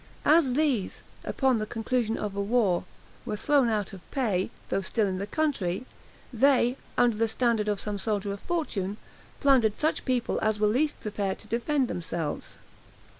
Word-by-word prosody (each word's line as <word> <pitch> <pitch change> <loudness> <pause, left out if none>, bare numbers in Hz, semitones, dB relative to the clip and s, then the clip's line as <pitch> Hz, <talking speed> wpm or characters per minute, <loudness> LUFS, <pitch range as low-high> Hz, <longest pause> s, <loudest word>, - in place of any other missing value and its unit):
As 300 -4 +5
these, 270 -8 0 0.2
upon 265 -3 +2
the 215 0 -2
conclusion 225 0 -1
of 205 -2 -4
a 200 - -1
war, 200 -4 +2 0.4
were - - -3
thrown 275 +1 +3
out 210 -2 -1
of 190 - -9
pay, 210 -9 0 0.2
though 195 - +1
still 210 +3 0
in 185 -1 -2
the 200 - -3
country, 245 - -1 0.5
they, 250 0 +4 0.2
under 240 -2 +4
the 225 +1 +2
standard 225 -2 +1
of 205 -2 0
some 205 -1 -3
soldier 205 -1 -1
of 200 - -7
fortune, 210 - -2 0.4
plundered 255 -7 +4
such 310 +1 +1
people 250 -3 0
as 215 -1 +1
were 210 - +3
least 270 +8 +1
prepared 205 -2 -2
to - - -12
defend 255 +4 +1
themselves. 165 -4 -4
220 Hz, 170 wpm, -28 LUFS, 200-255 Hz, 0.5 s, As